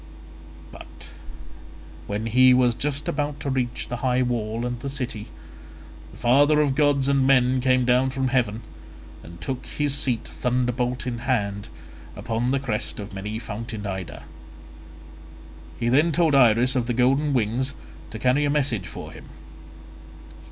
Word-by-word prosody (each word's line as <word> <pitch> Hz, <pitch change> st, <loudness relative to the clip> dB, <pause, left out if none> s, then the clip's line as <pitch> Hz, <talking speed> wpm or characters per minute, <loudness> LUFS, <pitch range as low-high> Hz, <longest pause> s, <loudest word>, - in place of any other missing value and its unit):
But -, -, -11 dB, 1.0 s
when 105 Hz, +2 st, -3 dB
he 125 Hz, +3 st, +5 dB
was 125 Hz, -1 st, +3 dB
just 140 Hz, +3 st, -3 dB
about 145 Hz, 0 st, -2 dB
to 140 Hz, -, -2 dB
reach 125 Hz, -2 st, -2 dB
the 120 Hz, -, -4 dB
high 125 Hz, +1 st, +1 dB
wall 115 Hz, -1 st, -2 dB
and 120 Hz, -1 st, -3 dB
the 140 Hz, -, -5 dB
city, 125 Hz, -6 st, -5 dB, 0.8 s
the -, -, -14 dB
father 145 Hz, +5 st, +4 dB
of 145 Hz, -3 st, +2 dB
gods 140 Hz, -1 st, +2 dB
and 140 Hz, -1 st, +2 dB
men 130 Hz, -1 st, +3 dB
came 130 Hz, -1 st, +2 dB
down 125 Hz, +2 st, +3 dB
from 130 Hz, -1 st, -1 dB
heaven 115 Hz, -4 st, 0 dB, 0.6 s
and 85 Hz, +1 st, -12 dB
took 125 Hz, +10 st, -4 dB
his 145 Hz, -2 st, +1 dB
seat, 125 Hz, -5 st, +2 dB
thunderbolt 125 Hz, 0 st, -1 dB
in 120 Hz, -2 st, -3 dB
hand, 100 Hz, -5 st, -1 dB, 0.5 s
upon 115 Hz, +2 st, -2 dB
the 135 Hz, +1 st, +1 dB
crest 115 Hz, -5 st, -3 dB
of 100 Hz, 0 st, -7 dB
many 105 Hz, +3 st, -5 dB
fountained 110 Hz, -1 st, -6 dB
Ida. 95 Hz, -2 st, -6 dB, 1.6 s
He 120 Hz, -, -1 dB
then 145 Hz, +7 st, +3 dB
told 160 Hz, -1 st, +2 dB
Iris 125 Hz, 0 st, +4 dB
of 120 Hz, -2 st, 0 dB
the 120 Hz, -, -1 dB
golden 135 Hz, +4 st, +2 dB
wings 125 Hz, +2 st, 0 dB, 0.3 s
to 110 Hz, -, -7 dB
carry 125 Hz, +5 st, +2 dB
a 145 Hz, -, +1 dB
message 135 Hz, -10 st, 0 dB
for -, -, -9 dB
him. -, -, -12 dB
125 Hz, 150 wpm, -24 LUFS, 115-135 Hz, 1.6 s, he